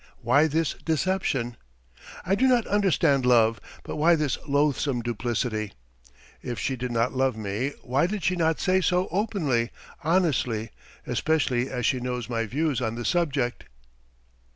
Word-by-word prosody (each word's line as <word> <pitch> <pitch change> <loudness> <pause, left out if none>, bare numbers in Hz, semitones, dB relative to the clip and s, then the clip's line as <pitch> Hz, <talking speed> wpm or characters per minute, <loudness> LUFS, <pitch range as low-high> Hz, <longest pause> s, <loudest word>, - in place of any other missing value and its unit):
Why 140 +7 +4
this 160 0 0
deception? 155 -8 -1 0.7
I 190 - +1
do 255 +7 +3
not 245 -3 +4
demand 185 -10 +2
love, 115 -2 +4 0.2
but - - -6
why 165 +3 +5
this 150 -5 0
loathsome 140 -3 +1
duplicity? 115 -2 -2 0.7
If 120 -2 -5
she 130 +8 -1
did 125 0 -4
not 115 +1 +1
love 130 -3 +1
me, 110 +7 -2
why 135 +6 +1
did 200 -1 -4
she 180 - +2
not 160 -2 +1
say 185 0 +2
so 180 +1 +1
openly, 165 - 0 0.3
honestly, 140 - +1 0.3
especially 135 -5 0
as 125 -3 -3
she 130 0 +2
knows 125 -1 -4
my 115 -1 -1
views 140 +1 -1
on 115 -2 -2
the 120 0 -5
subject? 140 -6 0
135 Hz, 150 wpm, -26 LUFS, 120-165 Hz, 0.7 s, why